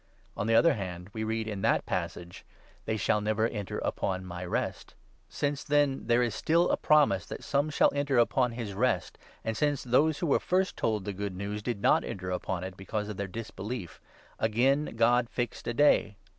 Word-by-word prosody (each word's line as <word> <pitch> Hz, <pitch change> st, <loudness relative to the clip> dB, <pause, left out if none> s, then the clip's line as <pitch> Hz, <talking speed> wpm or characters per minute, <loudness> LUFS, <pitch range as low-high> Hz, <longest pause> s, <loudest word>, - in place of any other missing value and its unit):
On 105 Hz, -, -2 dB
the 115 Hz, -, +3 dB
other 165 Hz, +7 st, +6 dB
hand, 90 Hz, -4 st, -6 dB
we 110 Hz, -1 st, -3 dB
read 110 Hz, 0 st, -2 dB
in 105 Hz, -3 st, -4 dB
that -, -, +2 dB
passage 85 Hz, 0 st, -4 dB
— -, -, -29 dB
' -, -, -31 dB
They 110 Hz, -, 0 dB
shall 105 Hz, 0 st, +1 dB
never 110 Hz, +1 st, +1 dB
enter 105 Hz, -4 st, -5 dB
upon 95 Hz, -1 st, -2 dB
my 90 Hz, 0 st, -6 dB
Rest.' 90 Hz, -, -3 dB, 0.3 s
Since, 145 Hz, -1 st, -2 dB
then, 145 Hz, -2 st, +1 dB
there 120 Hz, +1 st, +4 dB
is 120 Hz, -3 st, -1 dB
still 170 Hz, +9 st, +2 dB
a -, -, +4 dB
promise 145 Hz, -, +4 dB
that -, -, -7 dB
some 145 Hz, +2 st, +1 dB
shall 145 Hz, -, +3 dB
enter 140 Hz, -2 st, 0 dB
upon 120 Hz, 0 st, +2 dB
this 115 Hz, -4 st, -4 dB
Rest, 105 Hz, -3 st, 0 dB, 0.2 s
and 110 Hz, -, -2 dB
since 145 Hz, +2 st, 0 dB
those 140 Hz, +5 st, +3 dB
who -, -, -2 dB
were 145 Hz, -, +3 dB
first 185 Hz, +1 st, 0 dB
told 110 Hz, -4 st, -1 dB
the 100 Hz, -, -3 dB
Good 100 Hz, -1 st, -4 dB
News 100 Hz, +2 st, -4 dB
did 110 Hz, -2 st, -4 dB
not -, -, +4 dB
enter 90 Hz, -1 st, -5 dB
upon 90 Hz, 0 st, -3 dB
it, 95 Hz, 0 st, -6 dB
because 105 Hz, +2 st, -4 dB
of 105 Hz, -, -6 dB
their 100 Hz, -, -3 dB
disbelief, 110 Hz, -1 st, -6 dB, 0.4 s
again 130 Hz, +6 st, +1 dB
God 120 Hz, +1 st, +3 dB
fixed 120 Hz, -2 st, -4 dB
a 120 Hz, -, 0 dB
day. 115 Hz, -7 st, +4 dB
110 Hz, 205 wpm, -29 LUFS, 100-135 Hz, 0.4 s, other